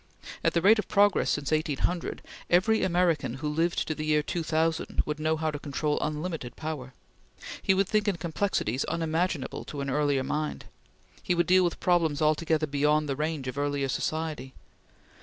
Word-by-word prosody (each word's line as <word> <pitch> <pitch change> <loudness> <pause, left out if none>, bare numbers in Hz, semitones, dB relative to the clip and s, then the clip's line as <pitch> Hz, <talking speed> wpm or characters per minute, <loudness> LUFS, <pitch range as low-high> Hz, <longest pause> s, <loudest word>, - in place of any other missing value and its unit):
At - - +1
the 170 - +2
rate 215 +3 +6
of - - -2
progress 205 -1 +3
since 145 0 -1
1800, 155 +3 -1 0.3
every 190 +6 +3
American 175 -8 +1
who 150 +3 -4
lived 165 +3 0
into 155 - -1
the 155 - -5
year 150 -1 +2
2000 160 0 0
would 150 0 -3
know 155 +1 +1
how 160 0 -1
to 145 - -5
control 150 +1 -1
unlimited 155 -4 -3
power. 145 -6 -6 0.7
He 190 - +3
would 195 0 +2
think 210 +1 +1
in 200 - +2
complexities 160 - -1
unimaginable 165 -2 -1
to 145 - -7
an 135 -1 -2
earlier 145 -2 +1
mind. 150 +3 -3 0.6
He 180 - 0
would 175 - +2
deal 185 0 +5
with 175 -2 -1
problems 165 -5 +2
altogether 155 0 +2
beyond 150 +1 +1
the 135 - -1
range 150 -2 -2
of 130 +2 -4
earlier 145 -1 0
society. 155 -2 -3
155 Hz, 175 wpm, -28 LUFS, 145-170 Hz, 0.7 s, rate